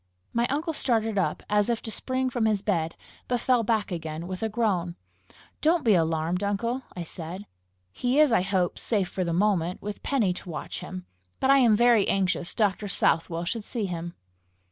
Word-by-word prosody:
My 235 +1 +2
uncle 315 +4 -1
started 225 -7 +1
up 190 - -1
as 210 +1 +2
if 235 -1 +1
to 220 - -4
spring 260 +2 -1
from 235 -2 0
his 210 -2 +1
bed, 165 -6 0 0.3
but 245 -1 0
fell 250 -1 +3
back 220 -2 0
again 160 -1 -4
with 185 0 -6
a 220 - 0
groan. 195 -6 0 0.7
"Don't 325 0 +3
be 220 - +6
alarmed, 165 +1 +1
uncle!" 230 +6 -1
I 175 - -4
said. 170 +4 -7 0.5
"He 250 - 0
is, 305 -4 +6
I 225 - +4
hope, 185 -2 0
safe 200 -6 0
for 185 - -2
the 170 - -1
moment, 180 -1 +1
with 205 0 -6
Penny 225 -10 +1
to 180 - -9
watch 160 - -5
him; 185 0 -7 0.3
but 265 - +3
I 275 - +7
am 235 -4 +5
very 235 -2 +4
anxious 185 -2 0
Dr. 205 -1 +1
Southwell 165 -2 +1
should 220 +5 -2
see 225 -1 -3
him." 175 -2 -5
205 Hz, 190 wpm, -26 LUFS, 180-235 Hz, 0.7 s, I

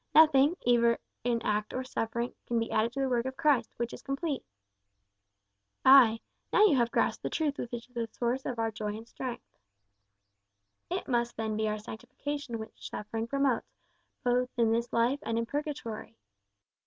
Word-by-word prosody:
Nothing, 305 +1 +6
either 235 -1 +4 0.3
in 235 -1 0
act 210 0 -1
or 255 - -1
suffering, 235 -1 -2
can 240 - 0
be 230 0 -1
added 220 +2 +2
to 275 - -2
the 270 - +2
work 245 -1 0
of 260 - -6
Christ, 275 -7 +3
which 235 0 -2
is - - -8
complete." 275 +1 -2 1.4
"Ay, 250 -4 +8 0.3
now 420 - +6
you 330 - +5
have 235 -2 +3
grasped - - +1
the - - -2
truth 305 -4 -1
which 240 - -4
is 240 +1 -7
the 235 -2 -2
source 245 +2 -1
of 250 - -3
our 225 0 0
joy 210 0 -4
and 225 +1 -11
strength." 250 0 -6 1.4
"It - - -3
must 240 -2 0
then 220 -1 -1
be 215 0 0
our 215 0 -1
sanctification 245 +4 -5
which 220 0 -8
suffering 225 +2 -4
promotes, 275 -1 0 0.5
both 250 0 +2
in 230 -2 +3
this 235 +1 0
life 240 +5 +2
and 230 0 -2
in 230 - 0
purgatory." 235 -5 -5
240 Hz, 175 wpm, -30 LUFS, 225-265 Hz, 1.4 s, Ay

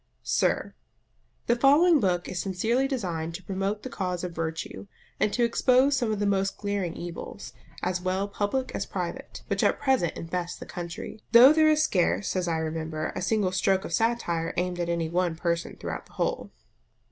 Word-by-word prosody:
SIR, - - 0 0.7
The 235 - +3
following 295 +6 +5
book 180 -5 0
is 180 - -3
sincerely 225 +8 0
designed 170 - -3
to 185 - -8
promote 195 +3 -2
the 260 - -5
cause 180 -2 -3
of 180 - -3
virtue, 165 +4 -5 0.3
and 210 - +2
to 240 - +1
expose 255 +4 +4
some 240 -5 0
of 215 - -1
the 205 - 0
most 195 -1 +1
glaring 200 -4 -2
evils, 170 -1 -7 0.3
as 180 0 -1
well 190 +2 -1
public 205 +6 -2
as - - -3
private, - - -5
which - - -1
at - - +2
present 265 - +1
infest 175 +1 -4
the - - -8
country; 175 +5 -7
though 250 +5 +10
there 310 0 +5
is 310 0 +4
scarce, 195 - +1
as 180 -1 0
I 165 -1 0
remember, 160 -1 -3
a 185 - -3
single 190 +1 +1
stroke 190 +1 +1
of - - -6
satire 225 -8 0
aimed 180 0 -1
at 170 -1 -1
any 170 -1 0
one 175 0 0
person 170 0 -2
throughout - - -6
the - - -22
whole. - - -2
190 Hz, 185 wpm, -27 LUFS, 175-235 Hz, 0.7 s, though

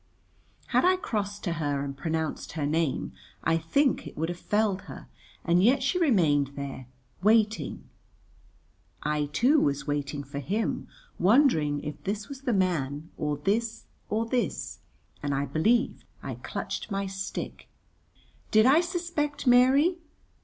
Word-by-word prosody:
Had - - +3
I 370 +1 +5
crossed 205 - -3
to 175 - -1
her 145 -2 0
and 140 -1 -5
pronounced 160 +2 -3
her 155 -2 -2
name 155 -1 0 0.3
I 165 0 +3
think 265 - +1
it - - -11
would 160 +2 -1
have 175 0 -5
felled 205 -2 +1
her, - - -9 0.4
and 175 +1 +4
yet 260 +5 +4
she 320 +7 +1
remained 155 - +3
there, 135 -2 -6 0.3
waiting. 215 +1 +2 1.2
I, 150 0 0
too, 250 - +3
was 140 - 0
waiting 145 0 -2
for 140 +1 -6
him, 205 - -2 0.3
wondering 180 - +3
if 150 -1 -6
this 205 +4 -3
was 275 -1 -8
the 260 - -1
man, 160 - 0
or 150 -1 -2
this, 225 +8 -1 0.3
or 220 +2 0
this, 245 +1 -2 0.4
and 145 -1 -1
I 140 +1 0
believe 215 - +1 0.2
I - - -4
clutched - - -5
my 195 -1 -1
stick. 195 0 -5 0.8
Did 215 0 +5
I 285 +6 +6
suspect 340 -5 -2
Mary? 265 +8 +5
195 Hz, 145 wpm, -28 LUFS, 150-245 Hz, 1.2 s, I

